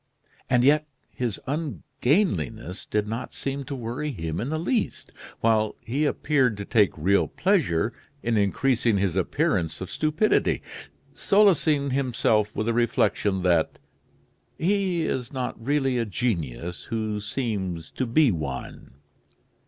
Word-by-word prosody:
And 125 Hz, -1 st, +4 dB
yet 150 Hz, +3 st, +4 dB, 0.2 s
his 120 Hz, -5 st, -2 dB
ungainliness 130 Hz, -, -1 dB
did 105 Hz, 0 st, 0 dB
not 115 Hz, +4 st, -4 dB
seem 140 Hz, 0 st, -3 dB
to 140 Hz, 0 st, -5 dB
worry 125 Hz, +5 st, -3 dB
him 80 Hz, -, -4 dB
in 120 Hz, -, -3 dB
the 155 Hz, -, -1 dB
least, 215 Hz, +8 st, -1 dB, 0.3 s
while 110 Hz, -1 st, +2 dB
he 140 Hz, +6 st, -1 dB
appeared 135 Hz, -7 st, +1 dB
to 100 Hz, -, -5 dB
take 105 Hz, -6 st, +3 dB
real 95 Hz, +6 st, +3 dB
pleasure 125 Hz, -, +1 dB, 0.3 s
in 120 Hz, -1 st, +1 dB
increasing 110 Hz, +2 st, +2 dB
his 95 Hz, -3 st, 0 dB
appearance 95 Hz, -, 0 dB
of 95 Hz, -, -6 dB
stupidity, 155 Hz, +7 st, +1 dB, 0.5 s
solacing 160 Hz, -9 st, +3 dB
himself 115 Hz, -5 st, +1 dB
with 110 Hz, -, -1 dB
the 115 Hz, -, +1 dB
reflection 105 Hz, -4 st, +1 dB
that 85 Hz, -3 st, +2 dB, 0.8 s
"he 185 Hz, -1 st, +1 dB
is 125 Hz, -5 st, -2 dB
not 125 Hz, -4 st, -4 dB
really 135 Hz, -1 st, +1 dB
a 115 Hz, -, 0 dB
genius 90 Hz, -, -3 dB
who 110 Hz, -2 st, -2 dB
seems 100 Hz, -, -3 dB
to 130 Hz, -, -2 dB
be 135 Hz, +2 st, +4 dB
one." 70 Hz, -6 st, -6 dB
115 Hz, 130 wpm, -25 LUFS, 100-145 Hz, 0.8 s, And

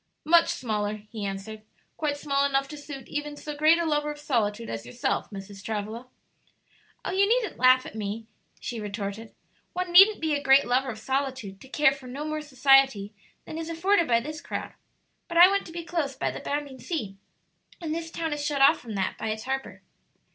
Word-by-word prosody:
"Much 335 Hz, +2 st, +5 dB
smaller," 210 Hz, -3 st, -2 dB, 0.2 s
he 220 Hz, -3 st, -5 dB
answered; 200 Hz, +3 st, -6 dB, 0.3 s
"quite 295 Hz, -2 st, -1 dB
small 280 Hz, -1 st, +1 dB
enough 275 Hz, -1 st, +1 dB
to 300 Hz, -, -8 dB
suit 285 Hz, -3 st, -9 dB
even 295 Hz, 0 st, -4 dB
so 300 Hz, 0 st, -6 dB
great 310 Hz, +3 st, +5 dB
a 340 Hz, -, 0 dB
lover 300 Hz, -1 st, 0 dB
of 295 Hz, -, -5 dB
solitude 230 Hz, -6 st, -1 dB
as 115 Hz, 0 st, -5 dB
yourself, 120 Hz, +1 st, -2 dB
Mrs. 195 Hz, 0 st, -9 dB
Travilla." 220 Hz, +3 st, -4 dB, 1.0 s
"Oh, -, -, -1 dB
you 395 Hz, +2 st, +3 dB
needn't 470 Hz, -2 st, +1 dB
laugh 255 Hz, +1 st, +6 dB
at -, -, -8 dB
me," 215 Hz, +1 st, -4 dB, 0.3 s
she 235 Hz, -, -5 dB
retorted; 205 Hz, +1 st, -5 dB, 0.4 s
"one 365 Hz, -1 st, -3 dB
needn't 390 Hz, +4 st, +8 dB
be 315 Hz, -1 st, 0 dB
a 285 Hz, -, 0 dB
great 270 Hz, 0 st, +5 dB
lover 255 Hz, +2 st, +1 dB
of 225 Hz, -, -5 dB
solitude 260 Hz, -5 st, -3 dB
to -, -, -12 dB
care 295 Hz, 0 st, +4 dB
for 275 Hz, -2 st, -9 dB
no 275 Hz, +4 st, -5 dB
more 310 Hz, 0 st, -3 dB
society 270 Hz, -7 st, +3 dB, 0.3 s
than 315 Hz, -, -6 dB
is 325 Hz, 0 st, -5 dB
afforded 340 Hz, +2 st, +2 dB
by 235 Hz, -1 st, +4 dB
this 305 Hz, +5 st, -6 dB
crowd. -, -, -5 dB, 0.5 s
But 340 Hz, -2 st, -3 dB
I 350 Hz, +1 st, +10 dB
want 395 Hz, 0 st, 0 dB
to -, -, -10 dB
be 340 Hz, 0 st, -5 dB
close 315 Hz, -6 st, -2 dB
by -, -, -1 dB
the -, -, -7 dB
bounding 285 Hz, -2 st, -4 dB
sea, 235 Hz, -, -4 dB, 0.6 s
and 325 Hz, -3 st, -3 dB
this 330 Hz, 0 st, -4 dB
town 325 Hz, -1 st, -3 dB
is 295 Hz, -1 st, -4 dB
shut 290 Hz, -1 st, -1 dB
off 275 Hz, -, +6 dB
from 225 Hz, -3 st, -7 dB
that 190 Hz, -1 st, -2 dB
by 220 Hz, -, -2 dB
its 220 Hz, 0 st, -3 dB
harbor." 270 Hz, +1 st, -4 dB
275 Hz, 205 wpm, -27 LUFS, 220-310 Hz, 1.0 s, I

